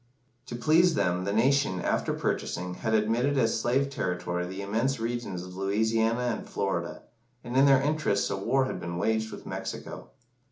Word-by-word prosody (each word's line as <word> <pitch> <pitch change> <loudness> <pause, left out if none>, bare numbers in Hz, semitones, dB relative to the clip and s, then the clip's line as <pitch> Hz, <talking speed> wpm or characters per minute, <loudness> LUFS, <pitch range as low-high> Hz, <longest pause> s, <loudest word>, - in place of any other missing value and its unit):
To 120 - -5
please 160 +7 +4
them, 90 -6 0
the 100 - -1
nation, 125 -2 +2
after - - 0
purchasing, 90 +1 -2
had 110 +4 -1
admitted 115 +6 +1
as 115 -3 +2
slave 135 +4 +1
territory 90 -6 -2
the 95 +2 -6
immense 115 +6 0
regions 115 -6 -3
of 90 0 -10
Louisiana 110 +4 +1
and - - -11
Florida, - - -2 0.4
and 120 0 -6
in 135 +1 +6
their 135 -1 +5
interests 150 -9 +1
a - - 0
war 130 +7 +1
had 130 - -4
been 85 0 -5
waged 110 +4 0
with - - -9
Mexico. - - -6
115 Hz, 170 wpm, -28 LUFS, 95-130 Hz, 0.4 s, in